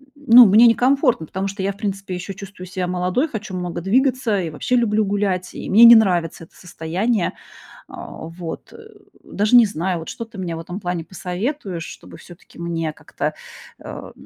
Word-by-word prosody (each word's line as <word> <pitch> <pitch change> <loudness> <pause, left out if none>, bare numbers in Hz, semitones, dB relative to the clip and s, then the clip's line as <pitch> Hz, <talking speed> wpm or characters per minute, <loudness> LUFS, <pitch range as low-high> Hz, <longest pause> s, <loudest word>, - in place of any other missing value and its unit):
ну, 250 -4 +7
мне 220 +4 +7
некомфортно, 250 - +2
потому 190 +1 -3
что 195 0 -5
я, 200 0 -1
в - - -20
принципе, 195 -2 -4
ещё 180 +2 -6
чувствую 190 -1 -10
себя 180 0 -3
молодой, 180 - 0
хочу 215 -7 -6
много 175 -1 -4
двигаться 245 - +1
и 165 - -4
вообще 250 +11 -1
люблю 220 -3 +2
гулять, 195 -2 -2
и - - -7
мне 220 +5 +6
не 235 0 +10
нравится 175 -6 +1
это - - -28
состояние. 180 +5 -2 0.5
А - - -10 0.2
вот, 165 0 -8
э, - - -13 0.5
даже 210 +4 +1
не 240 -2 +8
знаю, 175 -1 -3
вот 160 - -8
что 230 - -6
ты 225 -2 -15
мне 170 -3 -4
в - - -6
этом 175 +4 -7
плане 175 -2 -3
посоветуешь, 190 - -5
чтобы - - -12
всё-таки 175 -1 -16
мне 165 -2 -3
как-то, - - -5 0.5
э, - - -9
195 Hz, 185 wpm, -20 LUFS, 175-225 Hz, 0.5 s, не